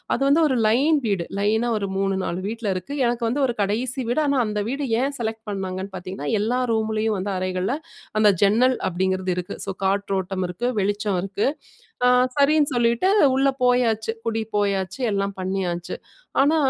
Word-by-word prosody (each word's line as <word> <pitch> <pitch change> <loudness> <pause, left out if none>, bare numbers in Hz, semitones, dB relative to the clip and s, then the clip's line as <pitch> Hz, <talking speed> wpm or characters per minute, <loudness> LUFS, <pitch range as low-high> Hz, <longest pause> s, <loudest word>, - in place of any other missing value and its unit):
அது 270 - -5
வந்து 300 +4 +4
ஒரு 260 - +1
லைன் 285 +7 +3
வீடு. 190 -5 0
லைனா 220 +4 +1
ஒரு 200 -1 -2
3, 195 0 +1
4 175 - -2
வீட்ல 225 -1 -3
இருக்கு. 275 +10 -5
எனக்கு 235 -1 -1
வந்து 280 +4 -1
ஒரு 240 - -2
கடைசி 240 +6 -1
வீடு. 245 - +1
ஆனா, 280 -2 +2
அந்த 210 -1 -2
வீடு 275 +2 -2 0.2
ஏன் 275 +1 -1
செலக்ட் 220 -1 -3
பண்ணாங்கன்னு 190 0 -4
பாத்தீங்கன்னா, 180 -5 -5
எல்லா 245 +4 0
ரூம்லேயும் 220 -1 0
வந்து 200 +1 -2
அறைகள்ல, 185 +6 -1 0.4
அந்த 210 -1 +6
ஜன்னல் 245 +6 +4
அப்டிங்கிறது 185 +1 0
இருக்கு. 180 - -4
ஸோ 195 - -2
காற்றோட்டம் 190 -1 -1
இருக்கு, 235 +8 -3
வெளிச்சம் 205 -1 0
இருக்கு. 200 +4 -1 0.6
ஆ - - +6 0.3
சரின்னு 290 0 +4
சொல்லிட்டு 235 +10 +2 0.3
உள்ள 275 +1 +3 0.2
போயாச்சு. 225 -3 +2
குடி 225 -1 -1
போயாச்சு. 200 +2 -1
எல்லாம் 200 0 -1
பண்ணியாச்சு. 180 -2 -2 0.5
ஆனா, 300 +4 +4
215 Hz, 165 wpm, -23 LUFS, 190-245 Hz, 0.6 s, அந்த